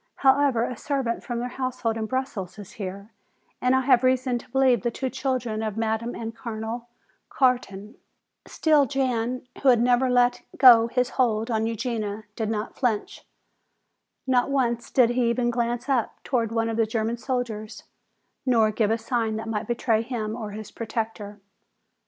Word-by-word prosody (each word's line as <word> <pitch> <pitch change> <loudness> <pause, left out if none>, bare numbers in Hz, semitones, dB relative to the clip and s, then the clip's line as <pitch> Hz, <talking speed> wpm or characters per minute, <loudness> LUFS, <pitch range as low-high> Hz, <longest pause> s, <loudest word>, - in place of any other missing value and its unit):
"However, 270 -3 +3
a 250 - -3
servant 265 -2 -2
from 240 - -4
their 240 +1 -2
household 250 -3 -2
in 220 -1 -3
Brussels 240 -8 -3
is 205 -3 -10
here 200 +1 -7 0.5
and 250 +1 +3
I 260 - +3
have 255 -2 +4
reason 255 -1 +2
to - - -16
believe 260 -4 +3
the 240 - 0
two 260 +2 -4
children 255 -4 -2
of 215 -1 -3
Madame 225 +1 -1
and 225 0 -6
Colonel 230 +1 -5 0.4
Carton." 235 -5 0 0.5
Still 300 -3 +3
Jan, 250 -1 -1 0.2
who 275 - +5
had 245 -2 +5
never 245 +2 +3
let 245 0 +3 0.2
go 240 -3 +8
his 250 +1 0
hold 225 -1 +1
on 220 0 +1
Eugenia, 220 -2 -3
did 220 -2 -2
not 215 -1 -3
flinch. 230 -5 -2 1.0
Not 255 -1 +2
once 240 -4 0
did 245 -3 +4
he 240 -1 +1
even 240 0 +1
glance 240 +1 -2
up 260 -5 0
toward 230 -5 0
one 225 0 0
of 225 0 -2
the 225 -1 +2
German 225 +1 -1
soldiers, 235 -4 -4 0.6
nor 230 -5 +3
give 215 -1 +1
a 225 - +2
sign 225 -1 -1
that 220 +1 -5
might 215 -1 -2
betray 230 -2 +1
him 225 -3 -4
or 220 -3 -5
his 215 +1 -8
protector. 220 -2 -5
235 Hz, 170 wpm, -25 LUFS, 220-255 Hz, 1.0 s, go